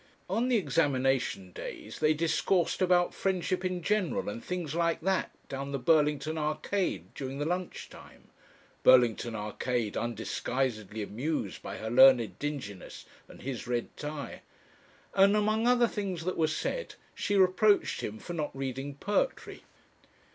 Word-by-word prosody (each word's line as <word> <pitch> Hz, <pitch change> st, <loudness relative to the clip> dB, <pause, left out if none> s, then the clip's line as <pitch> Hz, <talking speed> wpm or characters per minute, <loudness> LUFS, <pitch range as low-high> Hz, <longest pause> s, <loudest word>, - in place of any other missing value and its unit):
On 225 Hz, +7 st, 0 dB
the 255 Hz, -, +2 dB
examination 135 Hz, -, +1 dB
days -, -, -8 dB
they 155 Hz, 0 st, +3 dB
discoursed 165 Hz, +3 st, +1 dB
about 180 Hz, -1 st, +3 dB
Friendship 185 Hz, -1 st, -1 dB
in 185 Hz, -2 st, -2 dB
general, 210 Hz, -, 0 dB
and 115 Hz, +3 st, -6 dB
things 175 Hz, -5 st, -3 dB
like 170 Hz, 0 st, +1 dB
that, 190 Hz, +2 st, +1 dB, 0.2 s
down 140 Hz, 0 st, -5 dB
the -, -, 0 dB
Burlington 150 Hz, +2 st, +2 dB
Arcade 155 Hz, +6 st, -2 dB
during 135 Hz, -1 st, -5 dB
the 145 Hz, -, -2 dB
lunch 180 Hz, +2 st, -3 dB
time -, -, -15 dB, 0.5 s
Burlington 120 Hz, -2 st, +5 dB
Arcade 110 Hz, +1 st, -2 dB
undisguisedly 115 Hz, -1 st, -2 dB
amused 120 Hz, 0 st, -3 dB
by -, -, -6 dB
her 110 Hz, 0 st, -5 dB
learned 130 Hz, -2 st, +6 dB
dinginess 135 Hz, -10 st, -6 dB, 0.2 s
and -, -, -14 dB
his 130 Hz, -3 st, -5 dB
red 120 Hz, -1 st, -2 dB
tie 150 Hz, -3 st, -6 dB, 0.7 s
and 200 Hz, +1 st, +5 dB
among 215 Hz, +2 st, +2 dB
other 245 Hz, -1 st, +5 dB
things 190 Hz, -7 st, -4 dB
that 185 Hz, -, -1 dB
were 160 Hz, -, +2 dB
said 315 Hz, -, -3 dB, 0.2 s
she 205 Hz, -, -1 dB
reproached 195 Hz, +2 st, +3 dB
him 105 Hz, -, -4 dB
for 175 Hz, -, -7 dB
not 155 Hz, -3 st, -2 dB
reading 135 Hz, +1 st, -4 dB
poetry. 205 Hz, -, -1 dB
155 Hz, 140 wpm, -30 LUFS, 130-185 Hz, 0.7 s, learned